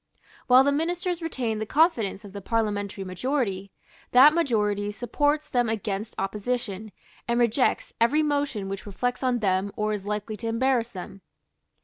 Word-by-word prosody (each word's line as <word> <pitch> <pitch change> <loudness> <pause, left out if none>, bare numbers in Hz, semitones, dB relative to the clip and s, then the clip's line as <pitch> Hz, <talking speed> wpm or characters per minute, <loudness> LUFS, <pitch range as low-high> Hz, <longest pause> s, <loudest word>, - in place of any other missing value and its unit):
While 255 +1 +7
the 285 - +2
Ministers 345 +3 -1
retain 245 -9 -2
the 215 - -2
confidence 230 - +2
of 200 - -11
the 200 - -7
parliamentary 205 -2 -2
majority, 195 0 -2 0.4
that 270 +5 +8
majority 210 -10 0
supports 290 +7 0
them 245 -4 +1
against 215 0 -3
opposition, 210 +1 -3 0.4
and 235 0 +1
rejects 240 +2 +1
every 295 +7 +4
motion 285 -9 -1
which 195 +1 -6
reflects 245 +5 -2
on 250 -3 0
them 190 0 +1
or 215 -2 -1
is 205 -2 -4
likely 210 +1 -4
to 230 - -5
embarrass 240 0 +1
them. 195 -1 -9
225 Hz, 150 wpm, -26 LUFS, 205-265 Hz, 0.4 s, that